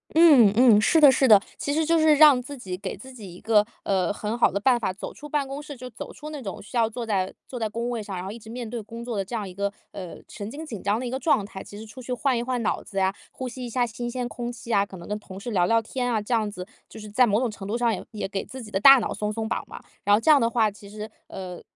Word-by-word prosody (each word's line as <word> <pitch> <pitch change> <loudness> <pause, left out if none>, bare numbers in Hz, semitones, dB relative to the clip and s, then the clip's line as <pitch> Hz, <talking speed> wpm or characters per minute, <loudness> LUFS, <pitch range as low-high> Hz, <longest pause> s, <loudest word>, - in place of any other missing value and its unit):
嗯 285 -11 +7
嗯， 235 -4 +6
是 320 +8 +4
的 285 -3 +9
是 265 0 +3
的， 210 -4 +8 0.2
其 285 - -2
实 315 +1 +1
就 330 0 +3
是 315 -1 +5
让 290 -4 +7
自 280 +3 -9
己 185 -7 -6
给 195 0 -5
自 265 0 -12
己 205 -8 -10
一 - - -13
个， 215 -2 +4 0.2
呃， 190 -2 +1
很 215 +3 -3
好 - - +4
的 200 - -3
办 240 +4 +3
法， 190 -4 -2
走 200 - -7
出 295 - -10
办 295 -1 0
公 275 +2 -6
室， 290 -1 -9
就 255 0 -9
走 230 - -9
出 300 0 -9
那 295 -3 -7
种 195 -5 -6
需 225 +5 -6
要 225 -1 +3
坐 230 +1 -5
在 190 -4 -1
坐 250 - -7
在 220 - 0
工 230 +3 -3
位 235 -2 -3
上， 205 -2 -6
然 180 - -5
后 195 - -5
一 230 - -9
直 220 0 -13
面 240 -1 -5
对 235 -1 -4
工 230 +3 -9
作 235 -3 -4
的 195 - -1
这 235 +5 -5
样 210 -3 -3
一 180 - -9
个， 200 +1 -2 0.2
呃， 185 -3 -8
神 205 +1 -7
经 305 +6 -7
紧 225 -10 -7
张 205 +2 +1
的 250 - -4
一 - - -3
个 260 +2 -3
状 260 -7 +2
态。 190 -1 -9
其 205 - -11
实 220 - -8
出 220 +4 -11
去 250 +1 -4
换 250 0 +1
一 - - -1
换 250 -1 -2
脑 220 - 0
子 195 - -10
呀， 190 0 +2 0.2
呼 255 -1 -5
吸 250 +1 -7
一 - - -6
下 245 +1 +1
新 240 +1 -5
鲜 250 0 -3
空 240 -1 -5
气 235 -1 -6
啊， 200 0 +3
可 195 - -12
能 175 +1 -10
跟 210 0 -2
同 190 -2 -11
事 235 +5 -6
聊 180 -4 +3
聊 230 +4 +3
天 245 +2 -3
啊， 225 -3 0
这 210 +4 -3
样 220 -2 +1
子， 180 -3 -7 0.2
就 - - -13
是 215 -1 -9
在 245 +4 +4
某 210 0 +2
种 245 - 0
程 195 -2 -8
度 220 - -1
上， 235 -2 +2
也 - - -5
也 215 - -4
给 195 - -3
自 260 -1 -9
己 215 - -11
的 195 - 0
大 275 +3 +9
脑 220 - -2
松 210 0 -2
松 220 0 -3
绑 - - -2
吧。 - - -11 0.2
然 205 - +6
后 - - +2
这 310 - +5
样 290 - +7
的 230 -2 +2
话， 225 -3 +2
其 200 0 -14
实， 215 +1 -8 0.2
呃， 180 -2 -8
230 Hz, 350 characters per minute, -25 LUFS, 205-255 Hz, 0.2 s, 的